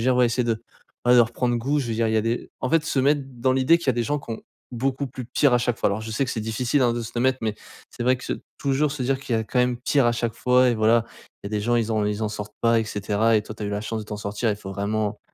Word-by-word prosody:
veux - - -2
dire 130 - +4
ouais, 125 -1 +5
essaie 120 +1 0
de, 115 - +2
heu, 110 - -13 0.4
bah, 125 0 +5
de 125 - +8
reprendre 120 +1 +1
goût 135 +6 0
je 125 - -4
veux 115 - -1
dire 115 +1 +1
il 110 - 0
y - - +3
a - - +4
des 115 +2 -2
en 130 - -2
fait 165 -2 +3
se 140 - 0
mettre 140 +2 +3
dans 130 0 0
l'idée 130 +5 +4
qu'il 170 - -6
y - - +7
a - - +1
des 120 - 0
gens 145 +5 0
qui 130 - -11
ont 110 - -6 0.3
beaucoup 135 +3 -1
plus 130 0 -7
pire 130 +2 +2
à - - +5
chaque 120 0 0
fois. - - +2
Alors 100 +2 -2
je 110 - -6
sais 135 - +1
que 125 - -4
c'est 110 - -3
difficile 120 +5 0
hein, 120 -1 +3
de 120 - -3
se 110 - -7
l'admettre 130 +2 +2
mais 110 -1 -1 0.3
c'est - - -6
vrai 130 +1 +4
que 125 - -11 0.3
toujours 140 +1 +1
se 145 -3 -4
dire 130 +1 0
qu'il 130 -3 -2
y - - +1
a - - -1
quand 125 - -2
même 125 0 +1
pire 130 +1 +2
à 120 - +3
chaque 120 -1 -2
fois 125 0 +3
et - - +1
voilà, 110 +1 +3 0.4
il - - -3
y - - -3
a - - -14
des 105 -1 -1
gens 120 +2 +1
ils 115 -1 0
ont 110 -1 +1
ils 105 +1 -2
en 110 - 0
sortent 105 0 -7
pas 115 0 +4
et - - -2
cetera 105 +2 +1
et 105 - +1
toi, 110 - -9
tu 110 - -5
as - - -2
eu - - -3
la 100 0 -2
chance 110 0 -3
de - - -7
t'en 105 - -5
sortir. 105 +3 -2
Il 105 - -1
faut 95 -1 -8
vraiment 105 +1 -2
120 Hz, 350 wpm, -24 LUFS, 110-130 Hz, 0.4 s, de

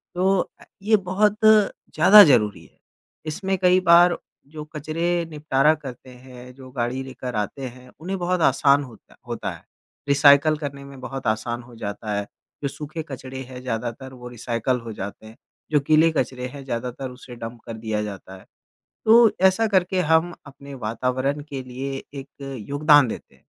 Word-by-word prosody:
तो 190 +1 +2 0.2
अ, - - -16 0.2
ये 215 +1 +4
बहुत 210 +3 +2
ज़्यादा 210 -2 +6
ज़रूरी 115 -8 +2
है। - - -24 0.5
इसमें 190 +5 -2
कई 180 0 +4
बार 175 +1 +7 0.3
जो 150 +1 -8
कचरे 165 +3 -1
निपटारा 150 -1 +2
करते 130 -4 -10
हैं 125 0 -13
जो 130 -1 -12
गाड़ी 125 +1 -2
लेकर 130 -2 -7
आते 105 +6 -3
हैं 125 +1 -15
उन्हें 190 +4 -4
बहुत 180 0 0
आसान 140 -2 +4
होता 120 -5 -15
होता - - -4
है। - - -12 0.4
रिसाइकल 145 +2 +5
करने 140 -2 -6
में 140 -1 -12
बहुत 135 -1 -6
आसान 120 +2 -1
हो 120 0 -15
जाता 105 0 -5
है 100 - -2 0.4
जो 140 - +1
सूखे 155 +3 -6
कचरे 130 0 -7
हैं 125 -1 -9
ज़्यादातर 125 +2 -5
वो 125 -1 -10
रिसाइकल 120 +1 -2
हो 115 -1 -7
जाते 100 +2 -7
हैं 110 +1 -13 0.4
जो 150 - +4
गीले 155 +1 +5
कचरे 125 -3 -2
हैं 140 +2 -10
ज़्यादातर 125 +1 -4
उसे 125 -1 -12
डंप 115 0 -8
कर 115 - -6
दिया 110 -1 -2
जाता 95 -2 -8
है। - - -17 0.6
तो 225 0 +7 0.2
ऐसा 220 +4 +1
करके 185 -2 +1
हम 160 +2 +3
अपने 140 +1 -12
वातावरण 130 +5 -2
के 135 -2 -5
लिए 135 +2 -6 0.2
एक 135 - -10 0.4
योगदान 145 -1 +5
देते 110 - -8
हैं - - -30
135 Hz, 170 wpm, -23 LUFS, 125-160 Hz, 0.6 s, बार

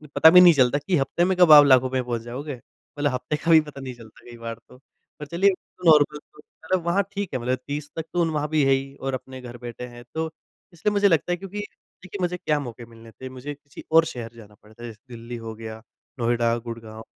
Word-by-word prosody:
पता 160 - +8
भी 180 +2 +8
नहीं 175 -2 +8
चलता 130 0 +3
कि 180 - +2
हफ्ते 140 +6 +1
में 185 -1 0
कब 175 -3 +6
आप 145 -1 +10
लाखों 130 -1 +5
में 130 -1 -1
पहुँच 120 -2 -3
जाओगे। 130 +4 -6 0.4
मतलब 145 -1 +1
हफ्ते 125 +4 -2
का 165 +3 -1
भी 160 -1 +8
पता 145 -2 -10
नहीं 130 -1 -6
चलता 110 -2 -16
कई 120 - -11
बार 115 0 -6
तो, 125 - -16 0.4
पर 150 - -6
चलिए 170 +6 +2 0.4
नॉर्मल 150 -2 +5
तो 150 - -20
होता 160 +1 -19
ना 185 - -1
वहाँ 180 +4 +1
ठीक 200 -2 -4
है, 130 - -1
मतलब 125 +2 -1
30 145 0 -5
तक 160 -1 -4
तो 175 -1 +2
वहाँ 150 -1 -1
भी 155 -2 +2
है 135 - +3
ही 135 +1 -2
और 135 0 -3
अपने 130 0 -7
घर 120 -1 -9
बैठे 120 0 -7
हैं। 120 - -11
तो 160 0 -2 0.4
इसलिए 190 +5 -1
मुझे 205 0 +3
लगता 165 0 +1
है 175 - 0
क्योंकि 195 +2 -7 0.4
देखिए 190 +2 -8
मुझे 180 0 -1
क्या 150 -3 0
मौके 120 -3 -8
मिलने 115 0 -15
थे 130 +3 -10
मुझे 130 +3 -7
किसी 145 -1 -14
और 165 0 +6
शहर 120 -6 -7
जाना 105 -2 -15
पड़ता, 110 +2 -15
जैसे 110 -3 -9 0.2
दिल्ली 115 +1 -8
हो 110 - -5
गया 110 0 -9 0.4
नोएडा, 120 0 +1
गुड़गाँव 115 -1 -9
135 Hz, 240 wpm, -24 LUFS, 120-160 Hz, 0.4 s, आप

